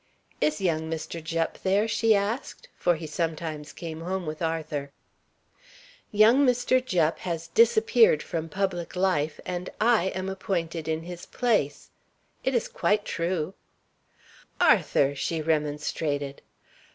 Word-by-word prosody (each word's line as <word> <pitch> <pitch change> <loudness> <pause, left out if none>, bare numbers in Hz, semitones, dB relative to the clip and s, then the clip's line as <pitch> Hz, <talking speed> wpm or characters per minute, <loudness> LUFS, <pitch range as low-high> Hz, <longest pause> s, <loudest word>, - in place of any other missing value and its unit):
"Is 150 0 +1
young 160 -4 0
Mr. 165 0 -5
Jupp 165 0 -2
there?" 200 +3 +2
she 225 0 +3
asked; 225 - -3
for 175 -1 +2
he 160 0 -7
sometimes 155 -1 -3
came 165 -1 -7
home 185 +1 -3
with 155 +1 -5
Arthur. 155 -3 -2 1.2
"Young 220 +6 +6
Mr. 250 0 +3
Jupp 170 -9 +1
has 170 -2 -4
disappeared 225 -6 +4
from 165 -1 -4
public 185 -1 -2
life, 180 -5 +1
and 180 0 -4
I 225 -4 +4
am 190 0 -2
appointed 170 -4 -3
in 160 0 -1
his 175 0 -8
place. 210 - 0 0.5
It 265 - 0
is 235 - +1
quite 210 0 0
true." 170 0 -2 1.1
"Arthur!" 140 0 +4
she 160 +4 -2
remonstrated. 150 -2 -1
170 Hz, 125 wpm, -27 LUFS, 155-200 Hz, 1.2 s, Young